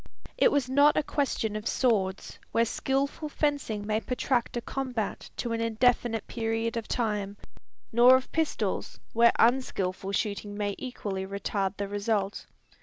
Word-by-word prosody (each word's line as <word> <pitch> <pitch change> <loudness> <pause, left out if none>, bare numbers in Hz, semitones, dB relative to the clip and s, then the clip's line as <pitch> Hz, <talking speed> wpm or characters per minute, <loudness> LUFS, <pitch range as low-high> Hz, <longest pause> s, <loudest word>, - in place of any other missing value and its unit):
It - - +4
was 280 -3 +1
not 285 +3 +5
a 305 - +3
question 255 -7 -1
of 215 +1 -4
swords, 195 -7 0
where 230 - +3
skilful 275 +5 -1
fencing 280 -9 -1
may 215 +1 0
protract 250 -1 -1
a - - -1
combat 250 -5 -3
to 235 - -2
an 230 - -1
indefinite 230 0 +1
period 225 0 -2
of 230 -2 -3
time; 210 -4 -1 0.5
nor 245 +2 +7
of 260 0 -1
pistols, 320 -1 -1
where 235 +1 +6
unskilful 200 -6 +1
shooting 205 0 -2
may 205 -1 -1
equally 200 -7 -4
retard 195 0 -2
the 200 - -2
result. 205 0 -1
230 Hz, 145 wpm, -28 LUFS, 205-255 Hz, 0.5 s, nor